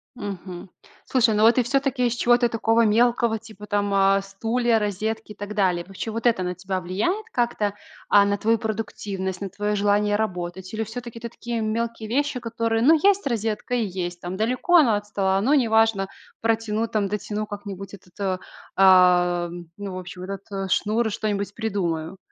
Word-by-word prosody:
Мгм. 195 -5 -7 0.4
Слушай, 235 -4 +3
ну 215 - +3
вот 230 +1 +6
ты 255 - +3
всё-таки 265 0 +1
из 235 - -1
чего-то 240 0 +3
такого 225 +1 +2
мелкого, 235 +1 +2
типа 215 -2 -12
там, 205 -1 0
а, 195 0 +4
стулья, 225 +4 0
розетки 215 +1 -2
и - - -9
так 205 +1 -7
далее. 180 -4 +1
Вообще, 195 +3 -5
вот 230 +2 -5
это 225 -6 +2
на 180 - -2
тебя 185 +1 -4
влияет 220 - -1
как-то, 220 -4 0 0.3
а, 200 -1 +6
на 200 0 +1
твою 225 +3 +2
продуктивность, 200 -4 -4
на 195 - -3
твоё 205 +2 -2
желание 205 0 +2
работать? 185 -2 -4
Или 225 - -1
всё-таки 230 +1 -7
это 235 0 -6
такие 235 0 -4
мелкие 225 0 -2
вещи, 285 +2 0
которые: 230 -1 -1
"Ну, 310 +6 +7
есть 400 +1 +3
розетка 225 -2 -2
и 235 -3 +1
есть. 175 -2 -4
Там, 175 +1 -5
далеко 250 - +1
оно 250 -10 +5
от 205 0 -3
стола, 195 -2 +1
но 250 +9 +2
неважно, 225 -5 +3 0.3
протяну, 225 0 0
там, 210 -3 0
дотяну 210 +1 -3
как-нибудь 200 -1 -8
этот, 185 0 -15
э, 190 -2 0 0.4
а, 180 -2 +5 0.3
ну, 200 -2 -6
в - - -5
общем, 180 0 -8
этот 195 0 -5
шнур. 220 +2 +1
Что-нибудь 205 -1 -2
придумаю". 190 -6 -2
210 Hz, 175 wpm, -24 LUFS, 195-230 Hz, 0.4 s, Ну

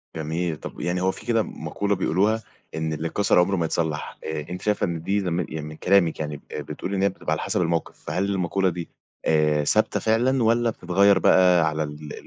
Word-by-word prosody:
جميل، 80 +2 -2
طَب - - -9
يعني 90 +1 -1
هو 95 +1 +2
في - - -12
كده 115 -2 +2
مقولة 100 -1 -2
بيقولوها 100 +5 +1 0.3
إن 80 0 -2
اللي 80 +2 -3
اتكسر 100 +2 +2
عمره 95 +3 +2
ما 85 -3 0
يتصلّح 80 -2 -2
آآ، 75 -1 -4
أنتِ 90 +1 -6
شايفة 105 -1 +1
إن 85 -3 -3
دي 100 +5 0
لم 90 -3 -1
يعني 80 -2 -4
من 75 - -8
كلامِك 90 0 +2
يعني 75 -2 -4
آآ، - - -4
بتقُولِي 100 +2 -5
إن 95 - 0
هي 100 - +4
بتبقى 95 - -6
على - - 0
حسب - - -1
الموقِف 85 -1 -1
فهل 95 +2 0
المقولة 95 -1 0
دي 85 -1 -6 0.4
آآ، 75 -1 +3
ثابتة - - +2
فعلًا 120 +3 +2
والّا 115 +1 +3
بتتغيّر 100 -1 +3
بقى 90 -4 +5
على 80 0 -2
ال 75 0 -7
90 Hz, 210 wpm, -24 LUFS, 80-100 Hz, 0.4 s, بقى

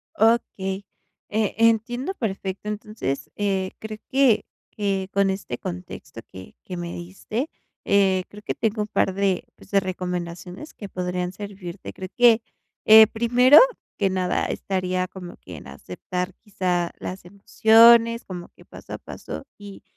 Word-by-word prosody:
Okey. 200 -4 +1 0.4
Eh, 215 -1 0
entiendo 230 - +2
perfecto. 200 - -4
Entonces, 210 -9 -4
eh, 195 -2 -1
creo 220 -1 -7
que 265 -4 +4 0.3
que 195 -2 -2
con 200 -1 +2
este 190 - -5
contexto 175 -8 -8
que 95 0 -11
que 180 - -7
me 175 0 -5
diste, 195 - -5 0.3
eh, 190 -2 +3
creo 210 0 -13
que - - -2
tengo 215 -1 -1
un 210 - -6
par 190 -2 +1
de, 195 -2 0
pues, - - -18
de 200 - +5
recomendaciones 180 - -5
que 205 - -8
podrían 180 -1 -3
servirte. 195 -2 -8
Creo 185 0 -7
que, 240 -2 +6 0.4
eh, 220 0 +10
primero 245 +5 +6 0.4
que 195 -2 +1
nada 185 -1 0
estaría 185 -1 -2
como 180 -1 -10
que - - -11
en - - -12
aceptar 180 0 -5
quizá 180 -4 -1
las 185 -1 -7
emociones, 230 +4 +5
como 175 -2 -8
que - - -20
paso - - -11
a - - -3
paso - - -8
y 205 -1 -11
195 Hz, 145 wpm, -24 LUFS, 185-220 Hz, 0.4 s, eh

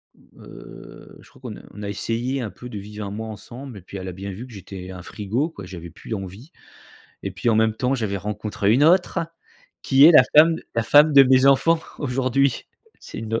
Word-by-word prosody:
Heu, - - -14
je - - -19
crois - - -21
qu'on - - -8
a - - -13
on 105 +1 -9
a 100 - -4
essayé 120 +6 -2
un 110 - -4
peu 125 +6 -11
de 105 - -7
vivre 105 +1 -8
1 100 - -6
mois 110 +2 -6
ensemble 120 +3 -10
et - - -11
puis 95 +2 -10
elle 95 0 -7
a - - -4
bien 95 +2 -7
vu 115 +7 -8
que 120 - -14
j'étais 95 -1 -9
un 90 -1 -9
frigo, 115 - -3
quoi. 100 - -11
J'avais 85 -2 -9
plus 110 - -9
envie. 100 - -8 0.7
Et - - -4
puis, 120 - -3
en 110 - +3
même 110 0 +2
temps, 125 +3 -1
j'avais 105 -5 -2
rencontré 105 +1 -2
une 140 +5 +4
autre 180 +1 +3 0.6
qui 135 +1 +5
est 170 - +9
la 130 - +9
femme 160 +1 +7 0.2
la 115 - +1
femme 145 +5 +5
de 140 -1 +9
mes 130 0 +4
enfants, 160 +4 +4 0.2
aujourd'hui. 130 -1 0 0.3
C'est - - -10
une 110 0 -4
aut - - 0
115 Hz, 230 wpm, -22 LUFS, 100-135 Hz, 0.7 s, est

